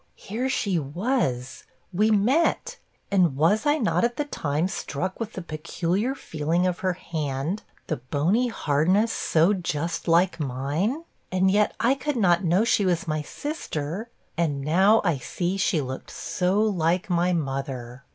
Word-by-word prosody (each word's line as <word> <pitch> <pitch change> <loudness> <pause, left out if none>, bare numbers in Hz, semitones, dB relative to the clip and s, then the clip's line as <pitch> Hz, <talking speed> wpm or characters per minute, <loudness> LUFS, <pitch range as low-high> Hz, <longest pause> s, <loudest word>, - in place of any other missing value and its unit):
here 240 +6 -3
she 200 -8 0
was; 145 - -2 0.3
we 210 +5 +3
met; 235 +11 +2 0.3
and 180 -8 +3
was 185 - +2
I 295 +1 +4
not, 230 -5 +1
at 240 0 0
the 295 - 0
time, 155 - -1
struck 185 -1 -4
with 230 -1 -4
the 185 - -6
peculiar 170 - -2
feeling 160 - -1
of 180 -1 0
her 185 -1 0
hand 155 +1 -3 0.2
the 155 - -2
bony 155 - +1
hardness 185 +3 +2
so 165 +5 +3
just 165 -3 -3
like 170 +2 +3
mine? 150 - -1 0.3
and 185 +1 +3
yet 210 +1 +2
I 240 +3 +4
could 275 +2 -2
not 175 -4 +3
know 180 +4 +3
she 225 -3 +2
was 180 0 0
my 155 -1 -1
sister; 195 - -5 0.3
and 150 -4 0
now 190 +9 +4
I 170 -8 +1
see 175 +9 -2
she 185 -4 +1
looked 130 -1 -6
so 185 +3 -1
like 180 -2 +1
my 175 -1 +2
mother.' 135 -5 -3
180 Hz, 155 wpm, -25 LUFS, 150-210 Hz, 0.3 s, I